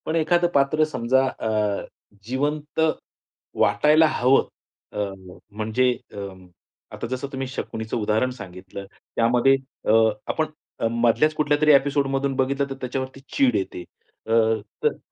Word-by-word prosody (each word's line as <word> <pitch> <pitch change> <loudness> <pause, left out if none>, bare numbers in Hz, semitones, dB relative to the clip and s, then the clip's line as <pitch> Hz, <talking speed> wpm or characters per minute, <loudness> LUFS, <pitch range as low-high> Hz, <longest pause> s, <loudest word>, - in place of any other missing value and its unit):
पण 160 - -1
एखादं 175 +2 +3
पात्र 140 +3 +3
समजा 130 -2 +1
अ, 105 -5 -1 0.4
जिवंत 145 +6 -2 0.8
वाटायला 150 +8 +5
हवं. 135 -3 +3 0.4
अ, - - -5 0.6
म्हणजे 110 +4 +2 0.2
अ, - - -10 0.8
आता - - -5
जसं 130 +3 -4
तुम्ही 135 0 -3
शकुणीचं 110 -3 -4
उदाहरण 110 +3 +1
सांगितलं, 95 0 -9 0.3
त्यामध्ये 120 +3 +4 0.3
अ, - - +4 0.4
आपण 155 - 0 0.3
अ, 115 - +1
मधल्याच 120 +6 +3
कुठल्यातरी 150 0 +3
एपिसोडमधून 140 -1 +2
बघितलं 140 +1 0
तर 135 - -5
त्याच्यावरती 130 +1 -4 0.2
चीड 125 -4 +3
येते. 95 -3 -3 0.4
अ, - - -4 0.5
तर - - +2
130 Hz, 125 wpm, -23 LUFS, 115-145 Hz, 0.8 s, वाटायला